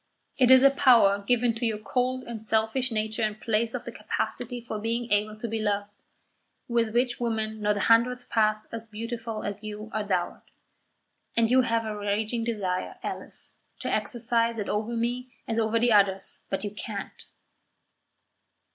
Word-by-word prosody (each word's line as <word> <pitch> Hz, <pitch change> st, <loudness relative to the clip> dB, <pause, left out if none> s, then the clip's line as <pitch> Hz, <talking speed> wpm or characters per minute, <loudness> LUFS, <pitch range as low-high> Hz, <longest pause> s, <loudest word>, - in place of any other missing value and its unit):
It 250 Hz, -2 st, +5 dB
is 260 Hz, 0 st, +8 dB
a 275 Hz, -, +8 dB
power 235 Hz, -8 st, +5 dB
given 235 Hz, +3 st, +2 dB
to 230 Hz, +2 st, -6 dB
your 225 Hz, -2 st, +1 dB
cold 255 Hz, +4 st, -1 dB
and 230 Hz, -3 st, -7 dB
selfish 220 Hz, +4 st, +1 dB
nature 220 Hz, +1 st, -2 dB
in 215 Hz, -1 st, 0 dB
place 225 Hz, +1 st, -1 dB
of -, -, -5 dB
the -, -, -5 dB
capacity 245 Hz, -1 st, -3 dB
for 230 Hz, -2 st, -5 dB
being 230 Hz, +2 st, -2 dB
able 210 Hz, +1 st, +1 dB
to 235 Hz, +2 st, -4 dB
be 225 Hz, 0 st, -2 dB
loved, 205 Hz, -1 st, -1 dB, 0.8 s
with 235 Hz, -2 st, 0 dB
which 245 Hz, 0 st, +1 dB
women 220 Hz, -2 st, -2 dB
not 210 Hz, 0 st, +1 dB
a -, -, -1 dB
hundredth 245 Hz, +3 st, +3 dB
part 215 Hz, -1 st, +2 dB
as 230 Hz, -1 st, -5 dB
beautiful 225 Hz, 0 st, -5 dB
as 205 Hz, 0 st, -4 dB
you 215 Hz, +1 st, -7 dB
are 215 Hz, -, -1 dB
dowered, 185 Hz, -4 st, -1 dB, 1.0 s
and 230 Hz, 0 st, +3 dB
you 260 Hz, +1 st, +6 dB
have 230 Hz, -2 st, 0 dB
a 215 Hz, -1 st, -3 dB
raging 210 Hz, +3 st, -1 dB
desire, 200 Hz, -6 st, -2 dB
Alice, -, -, -7 dB, 0.2 s
to -, -, -2 dB
exercise 230 Hz, -1 st, +1 dB
it 210 Hz, -, -3 dB
over 220 Hz, +3 st, -1 dB
me 245 Hz, +2 st, -2 dB
as 225 Hz, 0 st, 0 dB
over 220 Hz, 0 st, +1 dB
the 240 Hz, +1 st, +3 dB
others; 195 Hz, -2 st, +2 dB
but 195 Hz, 0 st, -2 dB
you 205 Hz, -, -3 dB
can't." 205 Hz, -1 st, -7 dB
225 Hz, 175 wpm, -27 LUFS, 210-235 Hz, 1.0 s, is